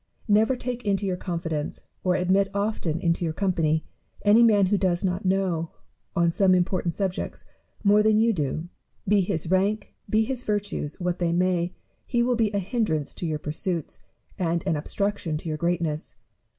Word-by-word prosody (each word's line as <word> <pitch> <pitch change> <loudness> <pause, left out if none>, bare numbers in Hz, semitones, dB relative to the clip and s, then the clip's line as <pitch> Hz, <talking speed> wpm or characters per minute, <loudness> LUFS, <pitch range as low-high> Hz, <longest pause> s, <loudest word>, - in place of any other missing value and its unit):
Never 220 +4 +4
take 245 0 -4
into 200 -1 0
your 185 -2 0
confidence, 165 -4 -3 0.2
or 180 -1 +2
admit 190 +2 +2
often 200 -6 -1
into 170 -1 0
your 160 -2 -1
company, 165 -5 +1 0.4
any 210 +3 +6
man 210 -4 +5
who 200 +2 +2
does 180 -2 +1
not 185 +1 -1
know, 185 -4 0 0.5
on 170 -2 +3
some 185 +1 +4
important 180 -1 0
subject, 190 -3 -3 0.4
more 205 0 +5
than 215 0 +4
you 225 +1 +4
do. 155 0 -2 0.4
Be 205 0 +4
his 165 -2 -2
rank, 200 +3 +1 0.2
be 215 +2 +3
his 250 +2 -3
virtues, 205 -9 -3
what 180 -1 -1
they 175 -1 +1
may, 175 0 +1 0.3
he 240 -1 +1
will 245 0 +2
be 225 -3 +1
a 200 - -1
hindrance 195 - -1
to 175 - -4
your 155 -1 -1
pursuits, 160 +2 -3 0.4
and 170 -2 0
an 160 - +1
obstruction 180 +1 -2
to 165 - -8
your 155 -1 -2
greatness. 170 -3 -1
185 Hz, 175 wpm, -25 LUFS, 170-205 Hz, 0.5 s, any